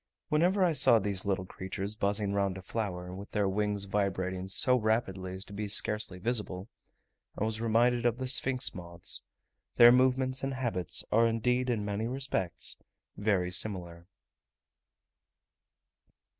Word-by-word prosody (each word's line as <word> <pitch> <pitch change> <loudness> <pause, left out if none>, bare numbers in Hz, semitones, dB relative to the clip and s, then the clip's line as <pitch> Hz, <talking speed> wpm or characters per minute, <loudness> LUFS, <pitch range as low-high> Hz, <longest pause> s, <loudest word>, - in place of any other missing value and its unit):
Whenever 180 +5 +3
I 175 - +2
saw 130 -5 +6
these 100 -3 -1
little 95 -2 -1
creatures 95 +3 -5
buzzing 100 -1 -1
round 100 -1 0
a 95 - -9
flower, 90 -4 -4
with 100 +2 -9
their 105 -2 +1
wings 105 +1 -1
vibrating 95 -2 -2
so 125 +6 +4
rapidly 100 -5 -1
as 95 - -5
to 100 - -13
be 105 +1 -4
scarcely 105 -1 0
visible, 105 -2 -3 0.7
I - - -1
was 110 0 -2
reminded 120 +1 +2
of 120 0 0
the 130 0 -4
sphinx 130 0 +2
moths: 85 -1 -1 0.5
their 120 0 +8
movements 130 +1 +2
and 135 0 -2
habits 115 -10 -1
are 115 +2 +4
indeed 125 +3 0
in 110 -4 -1
many 105 +2 -2
respects 125 -9 -1 0.3
very 100 -4 0
similar. 90 -3 -2
105 Hz, 145 wpm, -30 LUFS, 95-120 Hz, 0.7 s, their